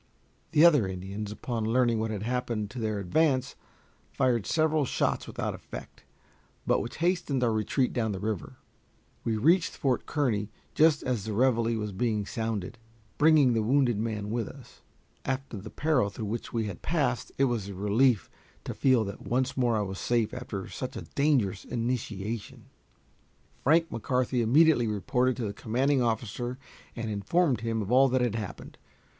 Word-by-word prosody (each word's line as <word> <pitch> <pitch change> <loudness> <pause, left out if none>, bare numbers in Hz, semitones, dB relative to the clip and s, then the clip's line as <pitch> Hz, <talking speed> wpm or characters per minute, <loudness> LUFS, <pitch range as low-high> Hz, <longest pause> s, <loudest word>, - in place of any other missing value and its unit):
The 155 +3 +7
other 145 - +5
Indians, 95 +3 -5
upon 115 +2 -3
learning 115 0 +2
what 110 0 -1
had 105 -2 -4
happened 115 -3 -2
to 125 - -6
their 110 -2 -1
advance, 130 - +1 0.6
fired 120 - +1
several 155 -1 +2
shots 130 - -1
without - - -3
effect, - - -10 0.6
but - - +2
which 120 - -6
hastened 160 -8 +1
our 120 - +3
retreat 110 +4 0
down 110 -3 0
the 95 - -4
river. 105 -2 -4 0.7
We 110 -1 0
reached 165 - +3
Fort 130 -3 0
Kearny 115 -9 0 0.2
just 155 -1 +4
as 120 -6 -1
the 110 - -3
reveille 115 -1 +2
was 105 -1 -3
being 105 +1 -1
sounded, 110 -1 -4 0.4
bringing 150 -4 +5
the 115 - +1
wounded 120 -1 +2
man 105 -2 -3
with 115 -2 -1
us. 135 -3 -14 0.4
After 135 -3 -3
the 105 +3 -8
peril 145 -8 +1
through 110 +2 -6
which 110 +3 -4
we 115 -2 -1
had 100 -4 -6
passed, 140 -6 -1
it 135 - +3
was 120 -7 0
a 100 - -7
relief 105 +4 +2 0.4
to - - -4
feel 130 -4 +3
that 100 -1 -7
once 130 +3 0
more 120 -3 +2
I - - +1
was 95 -1 -5
safe 120 -2 0
after 120 -6 -5
such 130 0 -6
a - - -5
dangerous 130 -10 +1
initiation. 115 -3 -4 1.0
Frank 165 +4 +3
McCarthy 125 +2 0
immediately 130 +1 +4
reported 125 +5 0
to 120 - -2
the 100 - -3
commanding 130 +6 +1
officer 120 +2 -2 0.4
and 115 -2 -3
informed 125 - +1
him 115 -1 -1
of 100 - -5
all 135 +2 +6
that 130 0 +1
had 120 -4 +1
happened. 110 -4 -6
120 Hz, 170 wpm, -28 LUFS, 105-130 Hz, 1.0 s, The